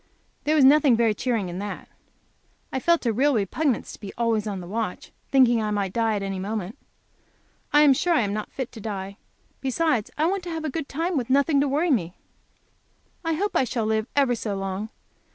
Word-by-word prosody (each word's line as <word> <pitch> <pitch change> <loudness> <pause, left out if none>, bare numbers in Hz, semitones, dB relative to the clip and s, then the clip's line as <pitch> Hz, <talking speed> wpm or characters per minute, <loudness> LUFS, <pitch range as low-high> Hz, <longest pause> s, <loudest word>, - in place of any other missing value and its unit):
There 305 +1 +2
was 285 -4 +6
nothing 280 -2 +6
very 225 -1 +3
cheering 225 -3 -1
in 175 +1 -5
that. 205 0 -6 0.9
I 265 - 0
felt 340 +1 +2
a 230 - +2
real 275 +5 +2
repugnance 235 +6 -1
to - - -12
be 200 -2 -7
always 225 -2 0
on 200 -2 -3
the 180 - -8
watch, 210 0 -4 0.2
thinking 245 -4 +4
I 215 - -1
might 200 -3 -1
die 225 -2 +1
at 200 - -2
any 195 -1 -3
moment. 205 0 -4 1.0
I 295 - +6
am 290 -2 +7
sure 345 +6 +1
I - - +3
am 200 -2 -1
not 215 0 -4
fit 260 -2 -5
to 225 - -10
die. 200 -2 -5 0.4
Besides 265 -3 0
I 305 - +2
want 385 +3 0
to - - -5
have 325 -1 -4
a 305 - -2
good 305 0 -4
time, 330 +4 -1
with 250 -2 -2
nothing 280 +2 +3
to 285 - +2
worry 305 +5 +1
me. 180 -9 0 1.1
I 330 -1 0
hope 400 +6 -2
I - - +4
shall 240 -3 -2
live 220 0 0
ever 275 -3 +3
so 215 -3 -3
long. 195 +2 -4
235 Hz, 215 wpm, -25 LUFS, 205-285 Hz, 1.1 s, am